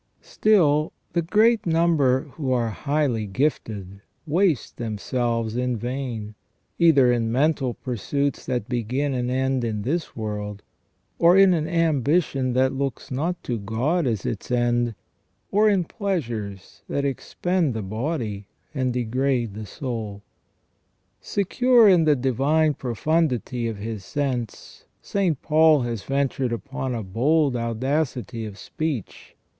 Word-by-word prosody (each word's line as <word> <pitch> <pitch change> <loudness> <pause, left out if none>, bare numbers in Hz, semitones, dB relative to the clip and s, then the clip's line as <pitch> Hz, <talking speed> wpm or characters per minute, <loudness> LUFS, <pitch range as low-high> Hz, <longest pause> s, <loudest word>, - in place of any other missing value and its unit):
Still, 155 -8 +3 0.2
the 170 - +2
great 215 +5 +3
number 160 -6 +3
who 145 -2 -4
are 120 -3 +1
highly 140 -4 -1
gifted 100 -5 -2 0.2
waste 165 -1 +1
themselves 115 0 -2
in 125 -1 0
vain, 120 -3 -4 0.5
either 140 -7 +5
in 115 -2 0
mental 135 -1 +1
pursuits 140 +4 -2
that 125 -2 -2
begin 130 +4 -1
and 125 -1 -1
end 130 0 0
in 110 -3 -2
this 160 +7 -2
world, 105 -2 -5 0.6
or 170 +2 +6
in 195 -1 +7
an 155 -2 0
ambition 155 -4 +1
that 130 +1 +2
looks 135 -2 -4
not 165 +7 -2
to 120 -3 -2
God 130 - 0
as 110 -5 -1
its - - -4
end, 120 -1 +1 0.6
or 215 +2 +4
in 195 -3 +2
pleasures 120 - -4
that 140 - -1
expend 160 +1 -1
the 110 - -3
body 110 - -3 0.3
and 130 -3 0
degrade 125 -1 0
the 105 0 -7
soul. 110 -8 -5 1.0
Secure 235 +4 +3
in 175 -5 +5
the 150 -1 +5
divine 140 +5 +2
profundity 125 -2 -1
of 110 -2 -4
his 105 -1 -5
sense, 130 -4 -4 0.2
St. 180 -8 0
Paul 155 -1 +5
has 120 -3 -3
ventured 135 -2 -1
upon 130 +1 -4
a 115 - -3
bold 135 +8 +2
audacity 120 -1 -2
of 100 -2 -10
speech. 150 - -5
130 Hz, 130 wpm, -24 LUFS, 115-155 Hz, 1.0 s, in